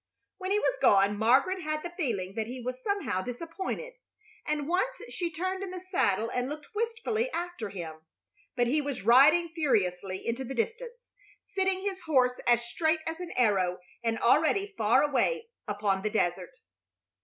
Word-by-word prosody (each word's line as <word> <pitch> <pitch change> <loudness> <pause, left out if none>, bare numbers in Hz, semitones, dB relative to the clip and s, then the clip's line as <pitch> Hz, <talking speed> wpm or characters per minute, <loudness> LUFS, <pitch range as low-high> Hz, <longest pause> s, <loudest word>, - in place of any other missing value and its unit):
When 375 0 -4
he 405 - +3
was - - 0
gone 200 0 +5
Margaret 265 - +3
had 310 -1 -2
the 350 - -5
feeling 225 - -2
that 220 +1 -2
he 250 +2 -6
was 255 +1 -5
somehow 400 - -1
disappointed, 335 - -5 0.5
and 295 -1 -1
once 390 +9 0
she 345 -2 -2
turned 370 +4 -3
in 395 - -4
the 365 0 -6
saddle 230 - 0
and 250 +1 -1
looked 300 +8 -8
wistfully 460 +1 -1
after 345 - -4
him; 165 -5 -7 0.5
but 245 -1 +2
he 290 +6 +2
was 280 -7 -4
riding 290 - +6
furiously 195 - 0
into 235 +3 -2
the 265 +1 -6
distance, 485 - -4 0.3
sitting 385 -1 -1
his 385 -2 -3
horse 255 -6 +2
as 240 -1 +4
straight 315 +6 0
as 325 +1 -4
an 360 -1 -5
arrow 195 -7 +2 0.3
and 225 -1 0
already 390 - +3
far 220 - +4
away 455 - 0 0.2
upon 205 -2 0
the 215 - -1
desert. 210 - -1
295 Hz, 165 wpm, -29 LUFS, 225-370 Hz, 0.5 s, riding